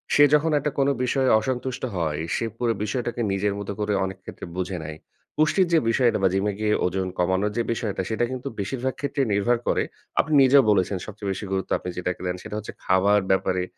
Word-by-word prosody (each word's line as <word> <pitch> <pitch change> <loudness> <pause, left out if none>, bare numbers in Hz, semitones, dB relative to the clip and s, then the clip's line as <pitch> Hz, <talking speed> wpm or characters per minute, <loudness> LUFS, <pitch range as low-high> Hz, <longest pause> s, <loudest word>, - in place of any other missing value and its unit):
সে 145 - +7
যখন 155 +2 +2
একটা 145 +1 -2
কোন 135 - +3 0.2
বিষয়ে 130 +1 +1
অসন্তুষ্ট 125 +2 -3
হয়। 80 -3 -1 0.2
সে - - -1
পুরো 120 -1 +1
বিষয়টাকে 120 +2 -2
নিজের 100 +1 0
মতো 100 0 -4
করে 105 0 0
অনেক 95 0 -6
ক্ষেত্রে - - -8
বুঝে 95 0 -2
নেয়। 75 0 -7 0.4
পুষ্টির 155 +5 +3
যে 165 - +6
বিষয়টা 120 0 +3
বা - - +6
জিমে 100 +2 +1
গিয়ে 105 0 +1
ওজন 95 +1 -1
কমানোর 95 +3 +1
যে 120 - +2
বিষয়টা। 105 -4 -2
সেটা 110 +2 +1
কিন্তু 130 +1 -5
বেশিরভাগ 125 +6 -2
ক্ষেত্রেই 140 -2 0
নির্ভর 100 +5 +2
করে। - - +2 0.4
আপনি 155 - -4
নিজেও 135 +1 +6
বলেছেন 95 -1 +1
সবচেয়ে 105 -1 -6
বেশি 95 +2 -4
গুরুত্ব 95 -1 -2
আপনি 90 - -6
যেটাকে 90 0 -3
দেন 90 - -1
সেটা - - -6
হচ্ছে 105 - -6
খাবার 100 +3 +4
ব্যাপারে 95 -1 +1
105 Hz, 200 wpm, -24 LUFS, 95-130 Hz, 0.4 s, সে